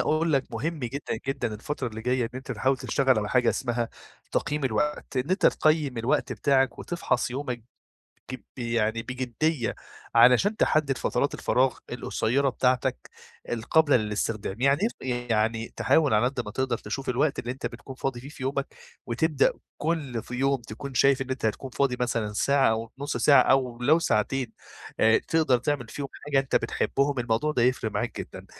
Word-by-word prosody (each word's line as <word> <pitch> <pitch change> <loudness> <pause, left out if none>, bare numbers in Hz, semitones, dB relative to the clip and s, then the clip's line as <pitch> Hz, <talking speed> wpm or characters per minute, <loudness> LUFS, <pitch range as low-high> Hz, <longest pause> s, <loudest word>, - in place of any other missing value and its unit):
أقول 160 +1 +1
لك 135 -2 +2
مهم 155 +8 -2
جدًا 125 -1 -4
جدًا 130 -5 -2
الفترة 130 +3 -4
اللي 110 -1 -8
جاية 125 0 +1
إن - - -3
أنت 130 0 -5
تحاول 130 +4 +1
تشتغل 130 -1 +2
على 105 0 -2
حاجة 125 -1 +3
اسمها 120 -3 -1 0.4
تقييم 150 -1 -1
الوقت، 135 +3 -1
إن 130 +7 -1
أنت 190 - +3
تقيّم 150 -6 +2
الوقت 130 +3 0
بتاعك 130 +1 +2
وتفحص 165 -8 -1
يومك 125 -3 -4 0.7
ج - - -3 0.2
يعني 115 -2 0
بجدية 125 +2 -1 0.4
علشان 125 - +5
تحدد 145 -8 +2
فترات 140 - 0
الفراغ 130 +1 +1
القصيّرة 125 +2 0
بتاعتك 125 - 0 0.4
القابلة 140 +6 +3
للاستخدام، 105 0 -3
يعني 140 +11 +3
إيه 120 -2 -3
يعني 115 +1 0
تحاول 135 +5 +3
على 105 +3 +4
قدّ 125 0 -1
ما 105 - -6
تقدر 130 -1 -1
تشوف 130 +6 -5
الوقت 135 +4 +1
اللي 120 - -3
أنت 130 +2 -7
بتكون 135 - -10
فاضي 130 -2 -3
فيه 135 +4 -10
في 135 - -9
يومك، 140 +1 -1 0.4
وتبدأ 140 +4 +2 0.2
كل 145 -8 -2
ف - - -14
يوم 135 0 +1
تكون 120 +5 -8
شايف 135 +2 +4
إن 130 - -4
أنت 130 -3 -2
هتكون 110 +5 -2
فاضي 125 -1 0
مثلًا 115 -4 -1
ساعة 140 +5 +3
أو 110 0 -3
نُص 145 +1 -2
ساعة 140 -3 +6
أو 130 -3 +2
لو 155 +6 +4
ساعتين 125 -2 0 0.5
آآ 110 0 +5
تقدر 155 -6 +2
تعمل 125 -1 -2
فيهم 140 -1 -5 0.2
حاجة 145 -2 +2
أنت 135 -1 -2
بتحبهم، 140 -1 0
الموضوع 120 +6 0
ده 125 -5 +1
هيفرق 125 -3 +1
معاك - - -3
جدًا - - -8
130 Hz, 170 wpm, -26 LUFS, 115-140 Hz, 0.7 s, ساعة